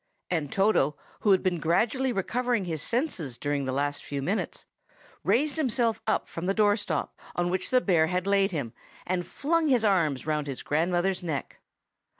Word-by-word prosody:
And 155 -5 -1
Toto, 195 -8 +2 0.2
who 210 - +1
had 190 -2 +5
been 180 -3 +1
gradually 225 - +1
recovering 240 +1 0
his 160 -4 -3
senses 185 - -2
during 145 -1 -1
the 130 - -1
last 145 +2 -1
few 140 -1 -4
minutes, 195 +9 -2 0.6
raised 295 +5 +2
himself 235 -6 +1 0.2
from 170 +2 -5
the 195 - +1
doorstep 205 -1 +1 0.3
on 175 0 0
which 185 - -1
the 255 -1 +4
bear 170 -7 +3
had 180 +2 -1
laid 200 0 +3
him, 140 - -4 0.3
and 180 0 -1
flung 325 +2 0
his 250 -5 +3
arms 165 -10 +2
round 150 -1 -1
his 135 -2 -5
grandmother's 175 +4 +1
neck. 160 -6 -4
185 Hz, 165 wpm, -27 LUFS, 155-225 Hz, 0.6 s, had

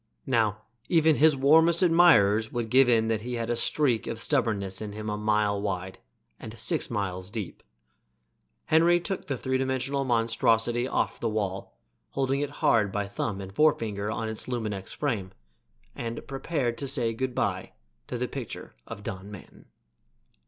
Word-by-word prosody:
Now, 110 -5 +1 0.3
even 160 -3 +4
his 155 0 +5
warmest 160 +6 +5
admirers 115 - +5
would 120 -2 -3
give 130 0 +6
in 110 -2 +3
that 110 -1 0
he 125 +2 -4
had 115 0 -2
a - - +1
streak 125 -1 +1
of 115 - -3
stubbornness 100 -4 -1
in 105 -1 -5
him 105 0 -4
a - - -1
mile 105 -1 +1
wide 95 -2 -4 0.4
and 110 +1 -9
six 110 0 0
miles 95 -4 -3
deep. 105 -4 -6 1.0
Henry 170 +2 +4
took 190 +2 -5
the 135 - -2
three 130 +2 -1
dimensional 130 +1 -1
monstrosity 115 0 +1
off - - -1
the 115 - -1
wall, 100 -3 -3 0.3
holding 135 0 0
it 145 -1 -1 0.2
hard 105 -4 +4
by 105 +1 -1
thumb 100 0 -3
and 95 0 -8
forefinger 110 -8 +1
on 115 +1 -3
its 110 -1 -5
luminex 110 -6 -4
frame, 105 -10 -3 0.6
and 115 -1 -5
prepared 135 -4 -2
to 140 - -3
say 120 -4 -1
good 125 +2 -3
by - - -2 0.3
to - - -4
the - - -2
picture - - -7
of 100 - -8
Don 95 0 -6
Manton. 105 -3 -13
115 Hz, 165 wpm, -27 LUFS, 105-135 Hz, 1.0 s, give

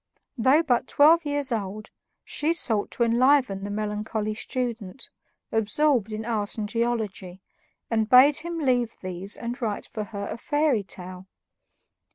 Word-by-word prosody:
Though 265 +6 +3
but 250 -6 +1
twelve 320 +3 +5
years 285 -2 -1
old, 215 -1 -4 0.3
she 310 +3 -1
sought 220 -10 +2
to 240 - -1
enliven 240 -3 +3
the 200 - -4
melancholy 210 +1 -3
student, 235 -2 -5 0.4
absorbed 225 +1 +1
in 215 +1 -5
art 215 -3 -3
and 210 -1 -2
geology, 220 -5 -3 0.5
and 220 -1 +1
bade 270 +3 +7
him 340 +1 -3
leave 250 -6 0
these 185 +2 -1
and 240 +3 -6
write 215 -3 -3
for 215 -2 -6
her 200 -2 -7
a - - -6
fairy 290 -5 +1
tale. 185 -1 -9
230 Hz, 145 wpm, -25 LUFS, 210-265 Hz, 0.5 s, bade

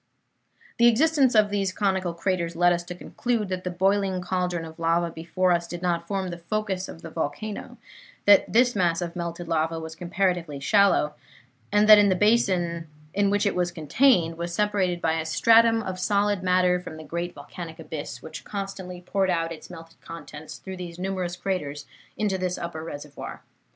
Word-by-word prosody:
"The 235 - +7
existence 270 +1 +4
of 210 -1 +4
these 195 -2 0
conical 190 -3 -1
craters 170 -1 -1
led 175 +1 +4
us 175 - -1
to 180 - -7
conclude 225 +2 -2
that 185 -1 -3
the 180 - -2
boiling 190 +1 +1
cauldron 180 -2 -2
of 160 +1 -11
lava 170 +1 +1
before 180 +3 0
us 170 -1 +1
did 175 +1 -7
not 170 -1 0
form 190 -1 -2
the 175 0 -6
focus 190 +1 -2
of 165 - -10
the 165 - -8
volcano; 165 +7 -4 0.5
that 205 -1 +6
this 245 +1 +4
mass 170 -3 +2
of 170 -1 -4
melted 170 0 -5
lava 165 0 0
was 160 0 -7
comparatively 175 -4 -1
shallow, 190 -1 +3 0.6
and 210 +1 +4
that 210 -1 +9
the 185 - +3
basin 180 -6 +2 0.3
in 200 0 +2
which 205 +1 +1
it 200 - +2
was 180 -1 0
contained 170 - +2
was 170 0 -3
separated 195 -4 0
by 165 0 +1
a - - -2
stratum 225 +7 +4
of 185 -2 -5
solid 205 +1 +1
matter 180 -1 +3
from 175 -3 -9
the 155 - -9
great 170 +3 -4
volcanic 160 +3 -9
abyss, 150 -3 -7
which 160 - -8
constantly 195 -3 -6
poured 190 +1 0
out 165 -2 0
its 165 - -9
melted 165 -2 -12
contents 155 -2 -9
through 190 -1 -8
these 175 -2 -7
numerous 185 -1 -3
craters 150 -7 -3 0.3
into 200 -3 0
this 180 -1 -1
upper 165 -2 -5
reservoir. 145 -2 -8
180 Hz, 180 wpm, -25 LUFS, 165-200 Hz, 0.6 s, that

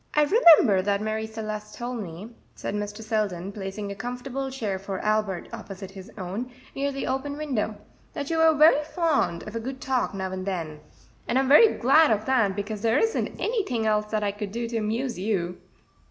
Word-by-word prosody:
"I 300 - +5
remember 295 - +6
that 200 +1 0
Marie 220 +1 -2
Celeste 215 -1 -6
told 240 -1 -4
me," 185 +4 -8 0.2
said - - -4
Mr. 205 +1 -4
Selden, 200 -4 -1
placing 200 0 -5
a - - -5
comfortable 250 +4 -4
chair 215 -8 -3
for 195 0 -5
Albert 210 -4 0
opposite 195 -1 -8
his 195 -1 -11
own, 200 +6 -4 0.2
near 280 +1 -1
the 275 0 -4
open 270 +2 -2
window, 255 -8 -2 0.4
"that 285 +2 -4
you 325 - +1
were 320 -1 +5
very 300 0 +6
fond 315 - 0
of 215 - -7
a - - -1
good 260 +3 -6
talk 255 -6 -1
now 190 -1 -3
and 185 0 -5
then; 165 -5 -3 0.5
and 240 - +1
I'm 265 0 +2
very 415 - +7
glad 295 +6 +5
of 215 0 +1
that, 230 -7 +2
because 205 +1 -4
there 225 +3 +2
isn't 450 +5 0
anything 385 - -1
else 210 -1 +1
that 215 0 -1
I 205 - +1
could 205 -1 -6
do 235 +2 -3
to 230 - -2
amuse 225 +1 -2
you." 185 -3 -1
220 Hz, 195 wpm, -26 LUFS, 200-265 Hz, 0.5 s, very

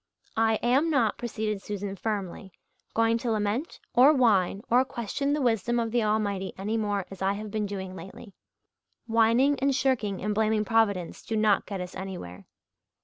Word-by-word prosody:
"I 225 0 +3
am 265 +7 +3
not," 250 -8 +1
proceeded 215 -3 -3
Susan 200 -1 -5
firmly, 195 -2 -4 0.4
"going 230 0 +3
to 240 - -3
lament 220 +7 -1
or 260 +5 +7
whine 205 -7 +2
or 245 +2 +4
question 265 +2 -3
the 295 -1 0
wisdom 240 0 +1
of 230 -1 -1
the 240 0 +2
Almighty 205 -3 -1
any 205 +4 -2
more 205 -3 -1
as 195 - -10
I 195 +1 +2
have 210 +1 -6
been 210 -1 -1
doing 190 -2 -6
lately. 195 +2 -11 0.7
Whining 230 +5 +3
and 275 0 +2
shirking 250 -7 0
and 210 +1 0
blaming 215 0 +1
Providence 205 -6 +1
do 225 - -4
not 215 -2 +2
get 195 -3 -4
us 180 0 -7
anywhere. 135 - -7
215 Hz, 170 wpm, -27 LUFS, 200-235 Hz, 0.7 s, or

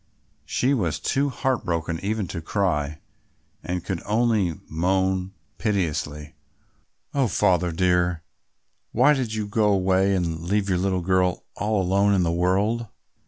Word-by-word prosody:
She 130 +3 +1
was 90 - 0
too 140 +1 0
heartbroken 85 -12 -1
even 105 -1 -1
to 85 - -5
cry 80 -5 -1 0.6
and 90 0 -3
could 95 -4 -3
only 105 -6 +1
moan 95 +3 0 0.2
piteously, 75 -8 -2 0.8
"Oh, 135 -3 +2
Father 90 -4 +2
dear, 90 -1 +1 0.7
why 130 +6 +5
did 125 -6 -2
you 110 -1 -2
go 105 +1 +1
away 95 0 +2
and 85 -3 -2
leave 100 +3 0
your 90 -2 +1
little 95 -1 0
girl 90 0 +1
all 105 -1 0
alone 100 +2 +3
in 90 - +2
the 85 - +1
world?" 100 +7 +1
95 Hz, 135 wpm, -24 LUFS, 85-105 Hz, 0.8 s, why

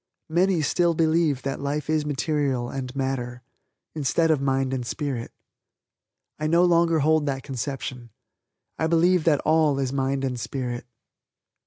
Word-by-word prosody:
Many 175 0 +2
still 170 +4 +2
believe 160 -4 +2
that 135 - -3
life 145 +1 -2
is 155 -1 0
material 140 -4 -1
and 130 -1 -5
matter, 125 -2 -3 0.5
instead 160 +2 +1
of 150 -3 +1
mind 135 -1 0
and 130 -2 -2
spirit. 130 -1 -4 1.1
I 155 - -1
no 170 +3 +4
longer 170 -2 +3
hold 155 0 +2
that 135 -1 -2
conception. 130 -2 -5 0.7
I 160 - +1
believe 170 +1 +3
that 150 -4 +3
all 155 -2 +3
is 135 -1 -1
mind 135 0 0
and 125 -2 -2
Spirit. 120 0 -4
140 Hz, 145 wpm, -25 LUFS, 130-160 Hz, 1.1 s, no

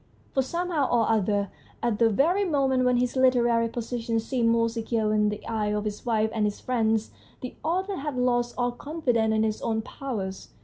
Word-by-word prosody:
For 265 - +2
somehow 335 0 -1
or 230 -2 +2
other, 205 -2 +1 0.3
at 235 -3 0
the 230 -1 +5
very 330 - +2
moment 270 -7 +1
when 250 0 +3
his 245 +1 0
literary 240 -3 +3
position 230 -1 -2
seemed 230 0 0
most 230 0 +2
secure 225 -2 -1
in 210 0 +3
the 210 0 -6
eyes 210 -2 -1
of 210 0 -2
his 210 -1 -4
wife 220 -1 +1
and 220 -2 0
his 205 -1 -2
friends, 225 -3 0 0.3
the 255 - -6
author 375 +4 -1
had 285 -2 -4
lost 245 -1 +1
all 245 0 +1
confidence 245 -5 0
in 220 - +2
his 215 -1 -1
own 220 -1 -1
powers. 210 -8 -5
235 Hz, 190 wpm, -26 LUFS, 220-260 Hz, 0.3 s, the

